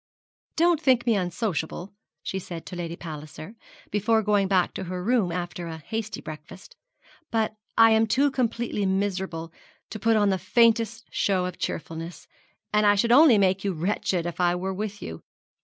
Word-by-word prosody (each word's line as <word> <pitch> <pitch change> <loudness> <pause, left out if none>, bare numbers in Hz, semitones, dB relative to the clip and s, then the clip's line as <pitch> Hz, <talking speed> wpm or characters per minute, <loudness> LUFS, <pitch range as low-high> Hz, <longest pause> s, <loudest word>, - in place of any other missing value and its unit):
'Don't 335 -1 +3
think 255 -5 +3
me 230 -3 +3
unsociable,' 180 -1 -3 0.3
she 190 - -3
said 170 -3 -8
to - - -8
Lady 170 -1 -4
Palliser, 155 +3 -9 0.4
before 220 +2 +2
going 205 -1 +2
back 185 -2 +2
to 190 - -5
her 180 0 -4
room 220 -5 +2
after 175 0 -4
a 160 -1 -6
hasty 220 +6 -5
breakfast; 155 +4 -11 0.5
'but 220 -1 0 0.2
I 225 0 +7
am 220 0 +4
too 275 +6 +2
completely 230 -5 -1
miserable 190 -4 -2 0.4
to 215 - -6
put 225 +2 +3
on 205 -1 +3
the 190 - 0
faintest 230 0 +2
show 185 -2 +1
of 180 -1 -6
cheerfulness, 165 +2 -5 0.5
and 210 0 +4
I 205 - +6
should 230 +4 +2
only 270 -2 +7
make 190 -1 +2
you 200 -2 0
wretched 175 0 -1
if 175 0 -5
I 175 0 +3
were 190 +2 -3
with 205 +1 -5
you. 80 0 -7
195 Hz, 175 wpm, -25 LUFS, 175-225 Hz, 0.5 s, I